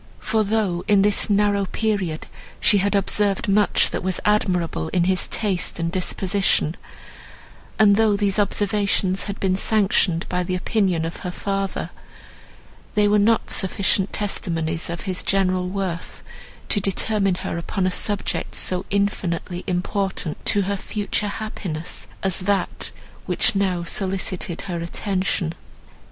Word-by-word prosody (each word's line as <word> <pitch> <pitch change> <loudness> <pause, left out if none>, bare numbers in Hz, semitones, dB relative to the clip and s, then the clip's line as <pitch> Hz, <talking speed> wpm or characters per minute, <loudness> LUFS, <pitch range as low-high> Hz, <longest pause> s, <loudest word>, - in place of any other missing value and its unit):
For 220 -1 0
though 200 -4 0
in 205 -2 +5
this 205 +1 +2
narrow 205 -1 +2
period 195 -7 -2 0.3
she 205 - +4
had 200 +2 +1
observed 200 0 +1
much 205 +1 +3
that - - -2
was 185 0 -1
admirable 180 - +1
in 175 - +1
his 185 +1 +2
taste 200 -5 -1
and 165 0 -1
disposition, 185 -2 +1 1.0
and 210 -2 +6
though 220 -1 +3
these 200 0 +2
observations 200 -2 +1
had 200 -1 -5
been 185 -1 +1
sanctioned 195 -4 +2
by 180 0 -1
the 180 +1 -2
opinion 180 -3 0
of 165 - -5
her 180 - -5
father, 195 +1 -3 1.0
they 210 0 +4
were 210 0 +4
not 225 +2 +2
sufficient 190 0 +1
testimonies 165 -6 -2
of 170 0 -4
his 185 -2 -2
general 185 -2 +1
worth 185 -3 -4 0.5
to 205 - +2
determine 195 0 +1
her 170 - -4
upon 185 +2 -2
a 185 - +1
subject 205 +2 0
so 185 0 0
infinitely 185 -3 -1
important 185 -2 -2
to 205 - +3
her 200 +1 -1
future 210 +1 -2
happiness 195 -6 -5 0.2
as 190 -2 +2
that, 195 +1 -1 0.4
which - - +2
now 190 -3 0
solicited 185 -1 -1
her 180 -3 -4
attention. 185 -1 -1
195 Hz, 140 wpm, -22 LUFS, 180-205 Hz, 1.0 s, and